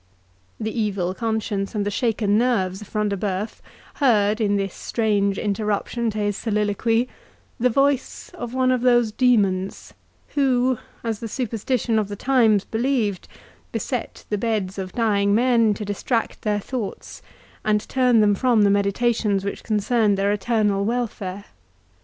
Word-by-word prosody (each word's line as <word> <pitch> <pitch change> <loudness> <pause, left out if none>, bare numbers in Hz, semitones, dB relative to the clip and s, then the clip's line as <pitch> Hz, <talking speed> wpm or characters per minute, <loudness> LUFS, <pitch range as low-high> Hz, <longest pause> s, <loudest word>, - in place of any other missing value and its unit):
The 220 0 -3
evil 200 -5 -1
conscience 220 -2 -2
and 205 -1 0
the 205 - -1
shaken 215 -2 +1
nerves 210 -5 +1
of 210 - -10
Front 210 0 -1
de 200 - -1
Bœuf 200 +2 -3 0.4
heard, 215 -5 +3
in 205 -1 +2
this 195 -2 -1
strange 205 -3 0
interruption 215 +3 -1
to 215 - -5
his 205 -1 0
soliloquy, 220 +2 0 0.5
the 250 +2 +3
voice 275 +2 0
of 240 -1 -6
one 255 0 +2
of 255 -2 +1
those 240 -3 +3
demons, 200 -6 +1 0.4
who, 260 -3 +2 0.2
as 225 -2 -2
the 230 - -5
superstition 230 0 -1
of 210 - -1
the 205 - -6
times 225 -4 +3
believed, 225 -5 -1 0.4
beset - - -4
the 210 - 0
beds 205 -4 -1
of 185 -1 -5
dying 205 -4 +2
men 230 -3 +3
to 210 - -5
distract 225 +3 -2
their 210 -1 0
thoughts, 225 -1 -6 0.4
and 210 0 +1
turn 250 -4 +3
them 205 -1 +4
from 235 0 +3
the 200 - +4
meditations 200 0 +1
which 200 - -4
concerned 215 -1 +1
their 200 +1 +1
eternal 210 -1 +1
welfare. 205 -4 -3
215 Hz, 150 wpm, -23 LUFS, 200-240 Hz, 0.5 s, them